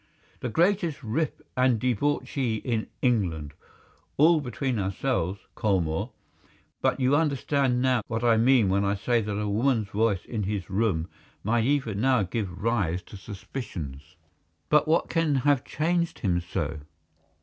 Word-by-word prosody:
"The 125 - -3
greatest 170 - +1
rip 150 +6 -2
and 125 -3 +3
debauchee 125 0 0
in 110 0 -2 0.2
England! 85 - 0 0.6
All 160 +2 +5
between 125 -1 -2
ourselves, 95 -1 -1
Colmore. 90 -7 0 0.7
But - - +1
you 130 +2 +3
understand 140 -4 +1
now 130 -3 +3
what 115 0 -2
I 115 -1 +5
mean 120 -2 +4
when 100 +2 +2
I 100 0 +1
say 115 +3 +1
that 105 -1 -3
a 105 - -1
woman's 110 0 +1
voice 105 -2 0
in 110 -3 -3
his 100 -2 -3
room 95 -6 +1 0.4
might 115 +2 +1
even 125 -7 0
now 130 -4 +3
give 95 -1 -4
rise 95 -7 0
to - - -13
suspicions." 90 - -7 0.5
"But 150 0 +4
what 160 +2 +2
can 165 -3 +1
have 135 0 +2
changed 170 +2 -1
him 90 -6 0
so?" 85 -3 -3
115 Hz, 145 wpm, -27 LUFS, 100-135 Hz, 0.7 s, All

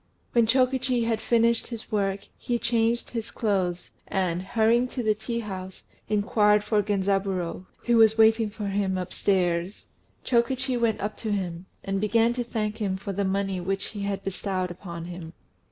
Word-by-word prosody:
When 235 -2 +4
Chokichi 255 0 +2
had 230 -1 0
finished 235 0 +2
his 230 -2 -8
work, 200 -2 0
he 240 - -2
changed 235 0 +1
his 230 -2 -4
clothes, 185 -5 -1 0.2
and, 180 -2 0
hurrying 230 +4 +2
to 250 -1 -4
the 215 -1 +3
tea 230 +2 -4
house, 190 -3 -7 0.3
inquired 210 0 +3
for 210 -1 +2
Genzaburô, 195 -3 -1 0.2
who 240 -1 +3
was 220 0 +6
waiting 220 0 +5
for 210 0 -6
him 195 -1 0
upstairs. 180 0 0 0.4
Chokichi 255 +2 +1
went 230 -2 +1
up 210 +2 -3
to 220 - -3
him, 185 -3 -3 0.2
and 195 0 -2
began 230 +2 +3
to 245 0 -2
thank 215 -2 -3
him 195 -3 -1
for 195 +1 -5
the 200 +2 -1
money 195 -1 -1
which 195 +2 -2
he 205 - -7
had 200 -1 -2
bestowed 185 -1 -2
upon 170 -2 -7
him. 175 -2 -8
210 Hz, 170 wpm, -26 LUFS, 190-230 Hz, 0.4 s, was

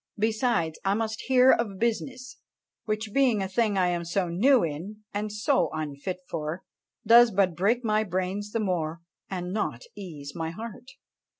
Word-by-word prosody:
Besides, 220 -6 0
I 195 +1 +2
must 220 0 -2
hear 260 0 +6
of 210 -5 0
business, 255 +4 -3 0.5
which 215 0 -2
being 250 -7 +3
a - - -2
thing 210 +1 +1
I 180 -1 +3
am 175 -1 -1
so 175 +1 -1
new 240 +9 +4
in, 175 +8 -5
and 210 +1 -2
so 210 +7 +1
unfit 155 +3 -4
for, 155 +4 -4 0.4
does 235 +2 +8
but 190 -4 +1
break 220 +8 +1
my 215 0 +2
brains 190 +1 -2
the 230 - -1
more, 170 -5 -2 0.3
and 180 -1 -4
not 200 - -2
ease 155 -8 -8
my 165 -1 -3
heart." 225 +7 -8
205 Hz, 165 wpm, -27 LUFS, 175-225 Hz, 0.5 s, does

